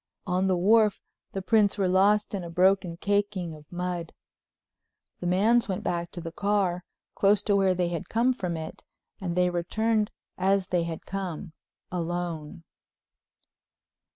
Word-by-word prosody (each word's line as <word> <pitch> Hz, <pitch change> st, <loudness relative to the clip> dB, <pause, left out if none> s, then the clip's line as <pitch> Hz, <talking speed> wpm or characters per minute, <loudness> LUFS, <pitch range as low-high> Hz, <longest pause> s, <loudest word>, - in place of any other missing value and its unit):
On 185 Hz, +1 st, +1 dB
the 185 Hz, -1 st, +2 dB
wharf 210 Hz, +3 st, +4 dB, 0.3 s
the 195 Hz, -, -3 dB
prints 210 Hz, 0 st, +3 dB
were 195 Hz, -2 st, +2 dB
lost 200 Hz, +4 st, +3 dB
in 195 Hz, -3 st, -2 dB
a 170 Hz, -, -6 dB
broken 185 Hz, 0 st, +2 dB
caking 200 Hz, -3 st, -1 dB
of 150 Hz, -1 st, -14 dB
mud. 175 Hz, -2 st, -3 dB, 1.1 s
The 175 Hz, -, -3 dB
man's 215 Hz, +7 st, +3 dB
went 190 Hz, -2 st, -3 dB
back 170 Hz, -1 st, -2 dB
to 175 Hz, -, -5 dB
the 165 Hz, 0 st, -6 dB
car, 190 Hz, -1 st, 0 dB, 0.3 s
close 205 Hz, 0 st, +3 dB
to 205 Hz, -1 st, +2 dB
where 190 Hz, -2 st, +3 dB
they 175 Hz, -1 st, 0 dB
had 170 Hz, -3 st, -4 dB
come 240 Hz, +3 st, +2 dB
from 180 Hz, -8 st, -3 dB
it, 160 Hz, -, -7 dB, 0.4 s
and 175 Hz, -3 st, -3 dB
they 180 Hz, 0 st, +3 dB
returned 215 Hz, +5 st, 0 dB, 0.3 s
as 190 Hz, 0 st, +2 dB
they 175 Hz, -2 st, +1 dB
had 165 Hz, -1 st, -6 dB
come—alone. 175 Hz, -3 st, -5 dB
185 Hz, 150 wpm, -27 LUFS, 175-200 Hz, 1.1 s, wharf